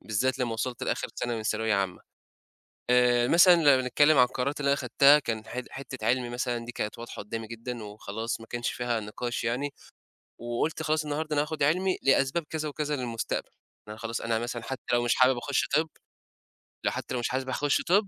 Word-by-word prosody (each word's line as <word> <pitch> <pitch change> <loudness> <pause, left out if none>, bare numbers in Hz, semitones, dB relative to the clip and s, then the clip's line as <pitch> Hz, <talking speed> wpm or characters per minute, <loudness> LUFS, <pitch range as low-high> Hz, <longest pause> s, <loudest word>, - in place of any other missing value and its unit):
بالذات 125 +5 0
لمّا 120 -3 -1
وصلت 120 +2 -3
لآخر - - -1
سنة 120 -1 -2
من 110 - -4
ثانوية 110 0 0
عامة. 95 -2 -1 0.9
آآ 125 0 +4
مثلًا 175 +1 +7
لمّا 145 -5 +5
بنتكلم 145 +4 +3
عن 125 - +8
القرارات 140 +4 -2
اللي 140 - 0
أنا 140 - +4
خدتها، 140 +3 +5
كان 110 -5 -4
حت 125 0 -5
حتة 135 -1 -7
علمي 125 0 +1
مثلًا 120 -1 -2
دي 120 - -7
كانت 105 -1 -4
واضحة 120 - -7
قُدّامي 110 +2 -5
جدًا 115 +1 -6
وخلاص 110 +2 -5
ما 115 - -11
كانش 120 +1 -2
فيها 120 -2 -1
نِقاش 115 +3 -4
يعني. 130 +5 -1 0.7
وقُلت 120 +7 -2
خلاص 155 0 0
النهاردة 150 +1 -2
أنا 145 - +3
هاخد 150 -1 -4
علمي 180 +6 +2
لأسباب 135 +4 +2
كذا 155 -1 -2
وكذا 150 0 -2
للمستقبل. 120 -3 -3
إن - - -47
أنا - - -9
خلاص 115 +1 -4
أنا 115 -1 0
مثلًا 120 0 -4
حتّى 130 +2 -6
لو 120 0 +3
مش 120 - +3
حابب 130 0 +5
أخش 140 +2 0
طِب، 160 +1 +2 1.0
لو - - +2
حتّى - - -5
لو 125 - -1
مش 120 - -1
حابب 130 0 -2
أخش 145 +2 +1
طِب 200 +3 +3
125 Hz, 205 wpm, -28 LUFS, 115-145 Hz, 1.0 s, عن